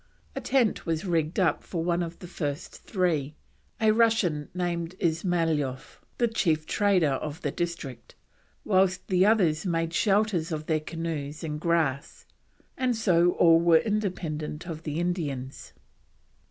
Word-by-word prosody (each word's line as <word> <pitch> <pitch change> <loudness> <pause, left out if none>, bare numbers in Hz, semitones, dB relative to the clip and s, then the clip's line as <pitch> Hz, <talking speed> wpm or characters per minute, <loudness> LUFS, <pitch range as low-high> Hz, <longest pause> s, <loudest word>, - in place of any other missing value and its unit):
A - - -3
tent 250 -9 +1
was 165 +2 -1
rigged 165 +1 0
up 175 -5 +2
for 170 -3 -3
one 175 0 +1
of 170 0 -5
the 180 - -10
first 150 -3 -4
three, 160 -7 -1 0.4
a 220 -1 +4
Russian 215 -10 +2
named 175 -1 -3
Ismyloff 195 - -1
(Ismailoff) 160 -5 -1 0.2
the 240 - +3
chief 165 -9 0
trader 190 -7 +2
of 150 +4 -4
the - - -1
district, 170 -7 -5 0.5
whilst 185 -2 +2
the 185 +1 +4
others 175 -8 +3
made 165 -2 -1
shelters 200 -4 +1
of 155 -1 -3
their 155 -1 +1
canoes 155 -2 -5
and 150 -2 -4
grass, 160 -4 -1 0.5
and 255 -2 0
so 175 -5 +3
all 165 -1 +5
were 170 -1 +5
independent 180 -6 -2
of 165 -3 -6
the 155 -1 -3
Indians. 145 -7 -3
170 Hz, 145 wpm, -27 LUFS, 155-185 Hz, 0.5 s, all